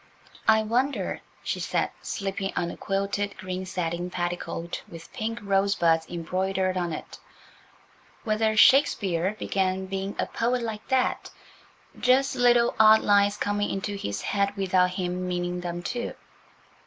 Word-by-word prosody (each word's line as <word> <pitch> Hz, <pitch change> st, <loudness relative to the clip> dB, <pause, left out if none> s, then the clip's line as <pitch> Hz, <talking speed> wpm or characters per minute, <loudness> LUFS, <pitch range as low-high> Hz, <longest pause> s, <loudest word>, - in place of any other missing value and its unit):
"I 220 Hz, 0 st, +5 dB
wonder," 250 Hz, +6 st, -1 dB, 0.2 s
she -, -, -2 dB
said, -, -, -1 dB
slipping 195 Hz, -1 st, -3 dB
on 170 Hz, -1 st, -1 dB
a -, -, -8 dB
quilted 200 Hz, +1 st, -2 dB
green 185 Hz, 0 st, -5 dB
satin 175 Hz, -1 st, -3 dB
petticoat 175 Hz, -1 st, -4 dB
with 165 Hz, -1 st, -12 dB
pink 225 Hz, +1 st, -3 dB
rosebuds 195 Hz, -5 st, +2 dB
embroidered 185 Hz, +2 st, -1 dB
on 175 Hz, -2 st, -1 dB
it, 155 Hz, -, -7 dB, 1.0 s
"whether 220 Hz, -1 st, +1 dB
Shakespeare 205 Hz, -, +4 dB
began 190 Hz, -2 st, -1 dB
being 195 Hz, +1 st, -4 dB
a -, -, 0 dB
poet 240 Hz, +1 st, -1 dB
like 220 Hz, -2 st, -5 dB
that–just 260 Hz, 0 st, -1 dB
little 240 Hz, -1 st, +4 dB
odd 220 Hz, 0 st, +7 dB
lines 205 Hz, 0 st, +3 dB
coming 205 Hz, 0 st, -1 dB
into 200 Hz, +1 st, -3 dB
his 100 Hz, -, -4 dB
head 200 Hz, 0 st, 0 dB
without 185 Hz, -1 st, +3 dB
him 180 Hz, 0 st, -3 dB
meaning 180 Hz, 0 st, -2 dB
them 175 Hz, 0 st, -4 dB
to." 240 Hz, -1 st, -4 dB
195 Hz, 130 wpm, -26 LUFS, 180-215 Hz, 1.0 s, odd